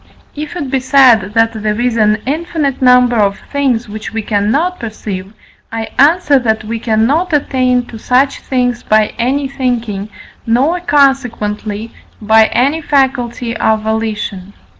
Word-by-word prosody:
If 300 +3 -6
it 285 -7 -4
be 270 - +1
said 255 -6 +4
that 225 0 +3
there 215 0 -2
is 245 -1 0
an 215 -1 +1
infinite 300 -1 -2
number 250 -1 +4
of 200 -2 +1
things 260 -5 0
which 210 +1 -7
we 225 -1 -3
cannot 245 - 0
perceive, 205 -4 -6 0.4
I 225 0 -4
answer, 295 -1 +4
that 220 -3 -1
we 225 +1 -4
cannot 250 +11 0
attain 255 -3 +1
to 225 -2 -10
such 260 +4 +1
things 245 -2 -1
by 215 0 +1
any 270 +4 0
thinking, 235 -7 -3 0.4
nor, 270 +10 +2
consequently, 230 -8 0 0.3
by 220 +1 +4
any 280 +6 0
faculty 250 -5 0
of 220 -1 +1
volition. 210 -3 -3
240 Hz, 140 wpm, -14 LUFS, 220-275 Hz, 0.4 s, said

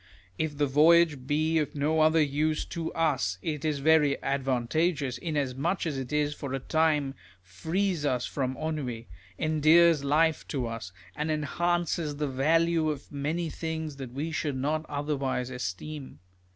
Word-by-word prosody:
If 155 -2 -2
the 145 - +2
voyage 150 -1 +4
be 155 +2 +2
of 150 - -3
no 150 +2 +1
other 155 0 +5
use 150 +2 0
to 165 -1 -4
us, 95 - 0
it 150 -3 -3
is 155 -2 0
very 155 -3 +4
advantageous, 135 +2 0
inasmuch 145 +2 -1
as 155 -4 -2
it 145 +3 -1
for 140 -3 -5
a - - -2
time 150 -1 +1 0.3
frees 160 - -2
us 125 -4 0
from 130 -2 -3
ennui, 140 -8 -4 0.3
endears 155 0 +4
life 155 +3 +2
to 135 -5 -2
us, 115 -5 -6 0.2
and 150 +1 -2
enhances 165 0 -1
the 150 0 -2
value 160 +4 +2
of 145 -2 -5
many 155 +4 -2
things 160 -3 -4
that 130 -3 -7
we 145 +6 -3
should 145 -3 -2
not 155 +4 -1
otherwise 140 -3 -2
esteem. 130 - -6
150 Hz, 150 wpm, -28 LUFS, 135-160 Hz, 0.3 s, other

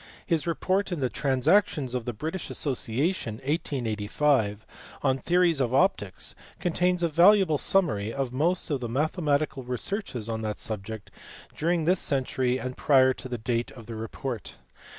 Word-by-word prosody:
His 165 -3 0
report 185 +4 0
in 175 - -2
the 130 -2 0
Transactions 135 0 +2
of 125 -2 -2
the 120 - -2
British 160 - -5
Association, 135 - -1
1885, 115 - 0 0.4
on 135 -1 +2
theories 170 -1 +3
of 125 0 +1
optics 135 - +1 0.3
contains 180 +1 +1
a - - +4
valuable 170 -1 +5
summary 115 - +1
of 135 -1 -3
most 165 +5 0
of 140 - 0
the 120 -2 -4
mathematical 150 +1 0
researches 125 - -3
on 110 -1 -3
that 105 -1 -3
subject 110 0 -6 0.4
during 165 0 0
this 180 +2 +3
century 130 -2 0
and 125 0 -5
prior 130 -2 +4
to 130 - -8
the 125 - -3
date 115 +1 -1
of 115 -3 -12
the 115 - -7
report. 115 +1 -5
135 Hz, 150 wpm, -27 LUFS, 120-165 Hz, 0.4 s, valuable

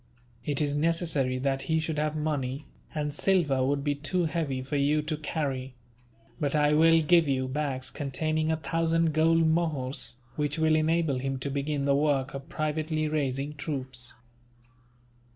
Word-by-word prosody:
It 145 +1 -1
is 145 -1 +1
necessary 150 -5 +1
that 135 +1 -1
he 160 - +3
should 160 -1 -2
have 155 0 0
money, 145 -2 -2 0.3
and 150 -1 -2
silver 150 -6 +2
would 140 +1 0
be 145 0 +1
too 160 +5 0
heavy 150 -5 -2
for 135 +3 -4
you 145 +2 +2
to 155 +1 -2
carry; 135 -4 -3 0.6
but 145 -2 0
I 150 0 +3
will 165 +1 +5
give 165 +1 +4
you 130 -1 0
bags 135 -1 -2
containing 155 +3 -1
a 160 - +1
thousand 165 0 +1
gold 165 +1 +4
mohurs, 155 -7 -1 0.2
which 150 0 -1
will 160 0 +3
enable 155 -3 +1
him 135 +1 -2
to 140 +2 -4
begin 140 0 -1
the 140 - +3
work 140 -2 +1
of 135 +3 -7
privately 155 0 -1
raising 145 -1 -1
troops." 130 -4 -4
150 Hz, 160 wpm, -28 LUFS, 135-160 Hz, 0.6 s, will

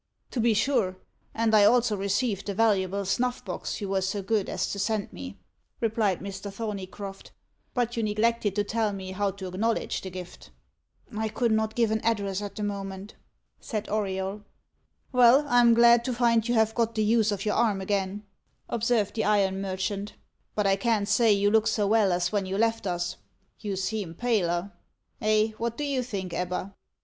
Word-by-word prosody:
"To 255 - -3
be 230 -1 +3
sure; 220 -6 +1 0.3
and 225 -1 +1
I 210 - +7
also 230 +1 +4
received 200 +1 -1
the 200 - -2
valuable 200 -3 +1
snuffbox 225 -3 -2
you 200 - -3
were 195 0 +1
so 195 +1 -2
good 210 -1 0
as - - -2
to 200 - -4
send 210 0 -1
me," 90 +2 -8 0.4
replied 215 -5 0
Mr. 195 +1 -6
Thorneycroft. 195 -2 -6 0.5
"But 240 -1 0
you 230 - -1
neglected 215 -1 +1
to 205 - +2
tell 220 0 -1
me 190 -1 -6
how 200 +1 0
to 195 0 -7
acknowledge 210 +5 -1
the 190 - -6
gift." 180 -1 -9 0.7
"I 220 +1 -1
could 235 +1 0
not 220 0 0
give 230 -2 +2
an 220 0 0
address 200 -3 0
at 205 -1 -6
the 210 - -4
moment," 195 0 -5 0.5
said 215 -3 -4
Auriol. 195 -1 -2 0.7
"Well, 250 +3 +6
I 245 -3 +4
am 235 -1 +6
glad 235 0 +6
to 255 - -1
find 230 -1 +2
you 240 - +1
have 220 -1 +3
got 230 -1 0
the 215 - +1
use 220 0 +3
of 200 0 -3
your 210 - +1
arm 220 -4 +2
again," 195 +1 -2 0.5
observed 230 -3 +1
the 220 - -1
iron 195 -2 +2
merchant; 195 +2 -3 0.4
"but 210 - +1
I 195 0 +3
can't 215 -1 +1
say 220 +2 +4
you 205 0 +3
look 220 0 +3
so 220 -2 +1
well 210 -2 +3
as 175 0 0
when 200 -3 -1
you 190 +1 -2
left 225 -1 +1
us. 175 0 -2 0.4
You 205 -3 -3
seem 190 -2 -3
paler 195 -5 0 0.5
eh? 215 0 +3
what 235 0 -2
do 295 - -2
you 280 -3 0
think, 195 -7 -5
Ebba?" 180 +2 -3
210 Hz, 185 wpm, -27 LUFS, 195-225 Hz, 0.7 s, I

